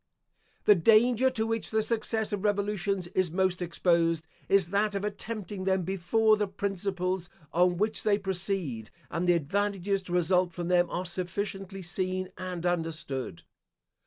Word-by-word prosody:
The 210 - +8
danger 230 +7 +4
to 225 -4 -1
which 225 0 -2
the 220 0 +1
success 220 -1 -1
of 205 -1 -2
revolutions 200 -2 0
is 185 -1 +1
most 185 0 +1
exposed 165 -2 +1 0.2
is 195 -4 +4
that 205 +1 +1
of 200 - -2
attempting 205 -2 -4
them 190 -1 +2
before 195 +5 +2
the 210 -1 0
principles 190 -2 -2 0.2
on 175 +1 +3
which 215 +3 0
they 210 -2 +3
proceed, 185 - -2 0.2
and 175 +2 -1
the - - +7
advantages 195 +4 0
to 185 -2 -7
result 180 0 +2
from 175 0 -4
them, 175 -1 +3
are 180 - -3
sufficiently 195 +2 -4
seen 185 +1 -2
and 180 -2 -5
understood. 160 - -2
190 Hz, 150 wpm, -29 LUFS, 175-205 Hz, 0.2 s, The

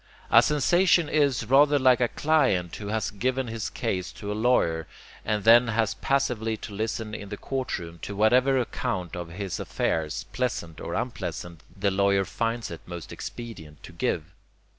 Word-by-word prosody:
A - - +9
sensation 175 +3 +3
is 140 -7 +2
rather 145 +4 +5
like 130 -2 +4
a 120 - +4
client 115 - +1
who 105 - -7
has 110 0 -1
given 130 +5 -1
his 115 -2 -4
case 90 0 -3
to 100 - -6
a - - 0
lawyer 105 -8 +1 0.4
and 105 -2 -1
then 120 +2 +7
has 110 -1 +1
passively 115 -5 0
to 105 - -9
listen 110 +1 -3
in 100 -2 -6
the 105 - -5
courtroom 90 -12 -4
to 100 - -6
whatever 125 +6 +4
account 115 -8 -2
of 85 -1 -5
his 95 +1 -5
affairs, 80 -2 -1
pleasant 100 -10 -3
or - - -4
unpleasant, 85 -2 -4 0.2
the 100 0 +1
lawyer 100 0 +2
finds 115 +3 -2
it 85 - -7
most 85 -3 -7
expedient 80 -11 -8
to - - -10
give. 85 0 -2
110 Hz, 165 wpm, -26 LUFS, 90-125 Hz, 0.4 s, A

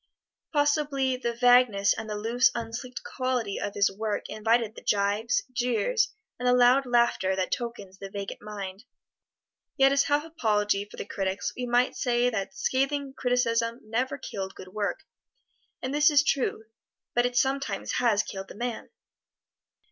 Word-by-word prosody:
Possibly 290 -3 +1
the 245 -2 -2
vagueness, 245 -5 +5
and 220 -1 -6
the 210 - -3
loose, 235 +4 +3
unsleeked 235 +2 -5
quality 255 -6 -2
of 205 - -4
his 200 -1 +3
work 215 0 -2
invited 225 0 +1
the - - -11
gibes, 210 - +1
jeers, 250 - +1 0.3
and 250 - -1
the 250 - +5
loud 250 +2 +5
laughter 235 -6 +2
that 185 -1 -2
tokens 205 -6 -5
the 195 - -7
vacant 200 0 -6
mind; 200 -1 -7 0.9
yet 270 -1 +5
as 275 0 +3
half 290 +1 +1
apology 210 -10 0
for - - -13
the - - -5
critics 195 -1 -2
we 250 0 -4
might 245 +1 +2
say 245 0 +1
that 220 +4 -3
scathing 275 +1 0
criticism 235 -2 0
never 245 +5 -2
killed 195 -7 -6
good 185 - -10
work; 205 +1 -3 0.8
and 260 +1 -2
this 295 +1 +5
is 290 -1 +5
true, 260 -6 0 0.5
but 240 0 +3
it 245 0 -4
sometimes 270 +1 0
has 225 -4 +3
killed 190 0 -7
the - - -11
man. 240 +1 -4
240 Hz, 155 wpm, -27 LUFS, 210-260 Hz, 0.9 s, vagueness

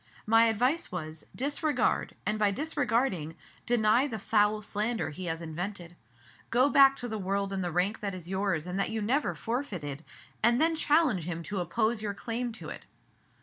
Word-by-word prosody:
My 225 +1 +6
advice 250 +8 +1
was: 155 -3 -6
Disregard, 285 0 0
and, 210 +2 0
by 210 -1 +4
disregarding, 230 - -1 0.3
deny 235 +3 +3
the 230 -6 -4
foul 210 0 +2
slander 215 +1 -1
he 185 +5 -6
has 165 -1 -2
invented. 175 +2 -6 0.5
Go 255 +4 +4
back 275 -1 +7
to 245 - -5
the 220 -2 -4
world 195 +1 -1
in 190 - -2
the 175 -1 -2
rank 180 +6 +1
that 200 -2 -3
is 175 -2 -8
yours 190 -4 -1
and 180 +2 -3
that 195 - +1
you 225 - -2
never 255 +8 0
forfeited, 185 - -4 0.4
and 235 +2 +4
then 325 +1 +3
challenge 290 - +2
him 170 -1 -4
to 200 +3 -4
oppose 215 +6 0
your 205 -2 -3
claim 235 +3 -3
to 225 - -8
it." - - -9
210 Hz, 180 wpm, -29 LUFS, 180-240 Hz, 0.5 s, back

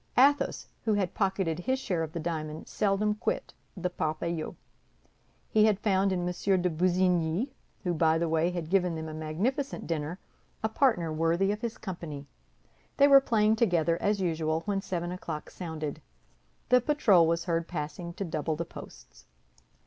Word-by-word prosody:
Athos, 285 +3 +4 0.2
who 215 -2 +3
had 195 -3 0
pocketed 190 -5 0
his 260 +9 0
share 185 -10 -2
of 160 -1 -3
the 170 - -4
diamond, 155 -2 -4
seldom 210 +1 +1
quit 355 - -3 0.2
the 180 0 -1
Parpaillot. 160 0 -2 1.0
He 215 -1 +5
had 210 -3 +3
found 195 -2 +2
in 180 -1 -1
M. 185 +1 +1
de 180 - +3
Busigny, 180 - +1 0.3
who, 180 -2 0
by 160 0 +3
the 170 +1 0
by, 165 +1 +2
had 175 -2 -5
given 180 -3 +2
them 160 0 -5
a 155 - -6
magnificent 190 - -2
dinner, 160 +1 -3 0.5
a 220 - +1
partner 220 - +2
worthy 165 +5 +2
of 210 +1 -4
his 235 -1 -3
company. 165 -7 -6 0.7
They 280 - +7
were 275 -1 +8
playing 220 -4 +2
together, 170 -7 +2
as 205 0 +1
usual, 160 -3 0
when 200 +1 -1
seven 175 -2 -3
o'clock 180 -4 -6
sounded; 155 -4 -5 0.7
the 250 0 +6
patrol 225 - +4
was 170 +1 0
heard 165 -1 0
passing 170 +2 -5
to 200 - -3
double 160 -1 -2
the 170 +2 -3
posts. - - -13
175 Hz, 165 wpm, -29 LUFS, 160-205 Hz, 1.0 s, were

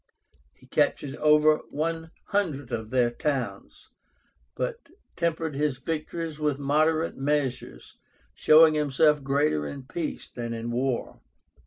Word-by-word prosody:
He - - -21
captured 140 -1 0
over 150 0 +5
one 160 +2 -3 0.2
hundred 155 -11 -1
of 110 -2 -4
their 125 -1 +2
towns, 135 0 -4 0.7
but 475 -8 -4 0.3
tempered 165 -2 -1
his 145 -2 0
victories 160 +2 -4
with 150 -2 0
moderate 155 +3 +1
measures, 135 -2 -3 0.3
showing 155 +1 +6
himself 150 0 +3
greater 135 - +1
in 140 -2 -7
peace 155 +4 -5
than 120 -1 -5
in 115 +1 -4
war. 125 +1 -2
150 Hz, 120 wpm, -26 LUFS, 130-160 Hz, 0.7 s, showing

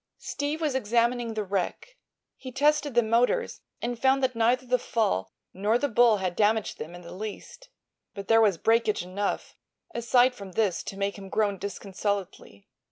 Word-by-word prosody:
Steve 290 +2 -3
was 305 -4 0
examining 235 -1 +1
the 215 - -1
wreck. 200 - -3 0.4
He 260 - -9
tested 290 0 +2
the 240 - +5
motors 245 - +1 0.2
and 240 0 -2
found 270 0 +3
that 255 -1 +1
neither 240 +3 +2
the 250 0 +1
fall 95 - -1 0.2
nor 205 +5 +1
the 285 - 0
bull 235 -3 +4
had 185 -2 -2
damaged 220 +1 +1
them 165 +3 -7
in 175 - -10
the 170 - -10
least. 220 - -8 0.5
But 200 -1 -7
there 225 0 +5
was 205 -6 +3
breakage 225 0 +2
enough, 195 +3 -3 0.4
aside 245 +2 +3
from 200 -5 -10
this, 205 -4 +1
to 195 - -6
make 200 +1 -2
him 195 -1 -9
groan 200 -2 0
disconsolately. 195 - -4
225 Hz, 170 wpm, -27 LUFS, 200-250 Hz, 0.5 s, the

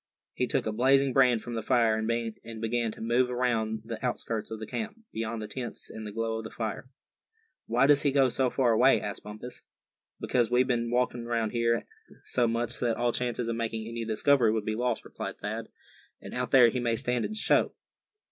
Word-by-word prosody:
He - - -1
took - - 0
a 110 - -1
blazing 135 +4 +3
brand 125 -4 +4
from 120 - -6
the 115 - -2
fire, 115 -1 +3
and 115 0 -3
began 115 0 0
to - - -12
move 120 +3 +2
around 115 -3 0
the 115 0 -6
outskirts 115 -3 -2
of 110 - -5
the 110 - -5
camp, 220 - -5 0.2
beyond 110 0 -3
the - - -5
tents 120 +2 -6
and 110 -1 -7
the - - -6
glow 115 +1 -2
of - - -6
the 110 - -7
fire. 115 +3 -5 0.8
"Why 120 +4 +3
does 145 0 +5
he 145 - +2
go 135 -1 +4
so 130 +1 +1
far 125 -2 +2
away?" 125 +4 +5
asked 100 -1 -5
Bumpus. 110 +4 -9 0.6
"Because 120 -3 +1
we've 125 +1 +3
been 120 -2 0
walking 120 -1 0
around 115 -2 0
here 115 -1 +1 0.4
so 120 -2 +1
much 115 +1 -1
that 115 -2 0
all 120 0 +1
chance 120 0 -2
of 115 -1 -2
making 115 -1 -3
any 115 0 -4
discovery 115 +2 +3
would 110 -1 -1
be 110 - -1
lost," 120 +1 -1
replied - - -6
Thad; - - -4 0.5
"and - - -10
out 125 0 -2
there 125 -3 +7
he 125 - -2
may 120 -1 +1
stand 125 +1 0
a 215 - -4
show. 220 - +2
115 Hz, 210 wpm, -28 LUFS, 110-125 Hz, 0.8 s, there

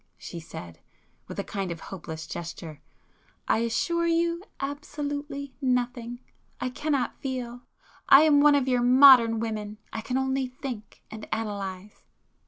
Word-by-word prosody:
she 170 - -8
said, 90 - -10 0.5
with - - -8
a - - -1
kind 195 -2 -4
of 165 - -5
hopeless 160 -4 -7
gesture—"I 165 +5 -6
assure 340 +9 0
you, 335 +1 +1 0.2
absolutely 285 0 -5
nothing! 245 -2 -1 0.4
I 255 - -2
cannot 285 0 -2
feel. 245 -2 -4 0.5
I 275 - +10
am 295 -2 +5
one 295 0 +6
of 275 -2 +1
your 250 -2 +2
modern 245 -3 +7
women,—I 215 0 -5
can 250 +3 -2
only 265 0 0
think,—and 235 -4 -8
analyse." 205 -2 -4
245 Hz, 125 wpm, -27 LUFS, 210-280 Hz, 0.5 s, I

